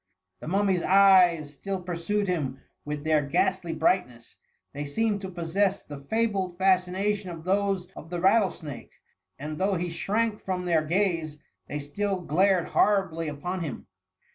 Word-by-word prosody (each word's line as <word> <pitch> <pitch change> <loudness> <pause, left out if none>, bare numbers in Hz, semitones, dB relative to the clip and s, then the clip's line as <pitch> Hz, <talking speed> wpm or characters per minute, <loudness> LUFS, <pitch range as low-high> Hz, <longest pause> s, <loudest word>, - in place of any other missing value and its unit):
The - - -9
mum 200 +4 +1
my^s 185 -3 +2
eyes 180 -6 +5
still 195 +6 -4
pursued 180 +4 -2
him 140 -7 -2 0.3
with 150 0 -4
their 155 -1 +3
ghastly 175 +5 0
brightness; 125 -12 -1 0.4
they 145 - -4
seemed 205 +8 -1
to 190 - -5
possess 190 +3 0
the 145 -1 -9
fabled 195 +1 -1
fascination 190 +2 +1
of 165 -2 -8
those 195 0 0
of 160 - -10
the 175 0 -3
rattle 195 +2 +4
snake, 145 -7 -9 0.4
and 150 +3 -6
though 195 +1 +1
he 175 0 -2
shrank 215 +5 -1
from 185 -1 -3
their 170 -3 +3
gaze, 165 -2 0 0.3
they 150 - -4
still 190 +7 -2
glared 180 +2 +2
horribly 190 -6 +2
upon 165 +6 -4
him. 155 -8 -5
180 Hz, 155 wpm, -27 LUFS, 155-195 Hz, 0.4 s, eyes